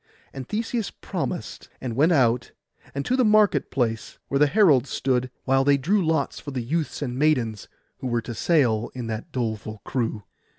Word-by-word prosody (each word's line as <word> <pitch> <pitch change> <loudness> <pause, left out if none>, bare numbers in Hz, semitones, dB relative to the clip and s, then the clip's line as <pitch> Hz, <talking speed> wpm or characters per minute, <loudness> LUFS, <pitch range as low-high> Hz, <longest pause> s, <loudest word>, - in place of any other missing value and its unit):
And 130 -2 -7
Theseus 225 0 -2
promised, - - -5
and 120 -3 -4
went 155 +7 +4
out, 125 -6 +2 0.4
and 140 - -2
to 255 - +1
the 260 - +3
market 215 -2 +4
place 115 -4 -2
where 140 - +1
the 150 - +6
herald 145 - +4
stood, 130 0 0
while 135 0 +3
they 140 0 +4
drew 185 +9 +1
lots 160 -4 0
for 145 - -8
the 130 -3 -3
youths 150 +3 -2
and 125 -1 -4
maidens, 125 -9 +1 0.3
who 130 - -4
were 120 -1 0
to 120 - -6
sail 120 -6 +2
in 125 -2 -4
that 115 +8 -5
doleful 110 -4 -3
crew. 115 -5 -2
135 Hz, 180 wpm, -24 LUFS, 120-160 Hz, 0.4 s, the